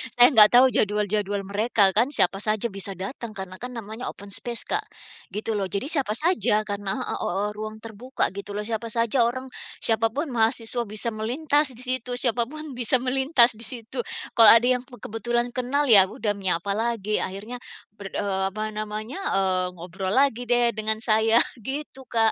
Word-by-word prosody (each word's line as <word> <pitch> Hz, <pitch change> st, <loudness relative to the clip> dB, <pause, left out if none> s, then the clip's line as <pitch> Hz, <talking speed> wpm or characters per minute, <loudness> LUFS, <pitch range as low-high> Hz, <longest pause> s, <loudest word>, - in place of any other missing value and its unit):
Saya 245 Hz, +1 st, +8 dB
nggak 215 Hz, -4 st, +9 dB
tahu 260 Hz, +2 st, +8 dB
jadwal-jadwal 205 Hz, -1 st, 0 dB
mereka 200 Hz, 0 st, +2 dB
kan 235 Hz, +4 st, +4 dB
siapa 195 Hz, +2 st, +2 dB
saja 215 Hz, +2 st, 0 dB
bisa 195 Hz, 0 st, -3 dB
datang 215 Hz, +3 st, -6 dB
karena 185 Hz, -1 st, -8 dB
kan 250 Hz, +1 st, -7 dB
namanya 225 Hz, +2 st, -6 dB
open 200 Hz, 0 st, -9 dB
space 235 Hz, +3 st, -4 dB
Kak, -, -, -2 dB, 0.5 s
gitu 215 Hz, +1 st, -2 dB
loh. 195 Hz, -, -2 dB
Jadi 200 Hz, +9 st, -3 dB
siapa 270 Hz, -9 st, 0 dB
saja 300 Hz, -, +2 dB
karena 205 Hz, -2 st, -4 dB
heeh, -, -, -4 dB
hooh 200 Hz, +3 st, -2 dB
ruang 215 Hz, +1 st, -7 dB
terbuka 230 Hz, +2 st, -3 dB
gitu 200 Hz, +1 st, -7 dB
loh 210 Hz, -, -3 dB
siapa 230 Hz, +1 st, -4 dB
saja 230 Hz, +1 st, +1 dB
orang, 260 Hz, +2 st, -5 dB, 0.3 s
siapapun 230 Hz, +6 st, 0 dB
mahasiswa 230 Hz, +1 st, 0 dB
bisa 215 Hz, +3 st, -3 dB
melintas 265 Hz, +5 st, 0 dB
di 245 Hz, -, -1 dB
situ, 255 Hz, -1 st, -2 dB
siapapun 245 Hz, +5 st, -1 dB
bisa 245 Hz, +1 st, +2 dB
melintas 255 Hz, -3 st, +3 dB
di 230 Hz, -, 0 dB
situ 245 Hz, 0 st, -5 dB, 0.4 s
kalau 225 Hz, -, +9 dB
ada 235 Hz, +2 st, +3 dB
yang -, -, -10 dB
be 250 Hz, -, -13 dB
kebetulan 240 Hz, +2 st, -2 dB
kenal 255 Hz, +4 st, 0 dB
ya 195 Hz, -4 st, +8 dB
udah 210 Hz, +2 st, -2 dB
menyapa 190 Hz, 0 st, -1 dB
lagi 220 Hz, -2 st, -1 dB
akhirnya 210 Hz, +6 st, -5 dB, 0.3 s
berdo 200 Hz, -2 st, -10 dB
eee, 190 Hz, -1 st, -2 dB
apa 215 Hz, +2 st, -4 dB
namanya, 215 Hz, -, -5 dB, 0.2 s
eee, 185 Hz, -1 st, +1 dB
ngobrol 185 Hz, +2 st, -5 dB
lagi 255 Hz, -3 st, +2 dB
deh 240 Hz, 0 st, +3 dB
dengan 220 Hz, 0 st, -1 dB
saya 225 Hz, 0 st, +4 dB, 0.2 s
gitu 265 Hz, +2 st, -7 dB
Kak. 225 Hz, -1 st, +2 dB
225 Hz, 175 wpm, -24 LUFS, 205-245 Hz, 0.5 s, nggak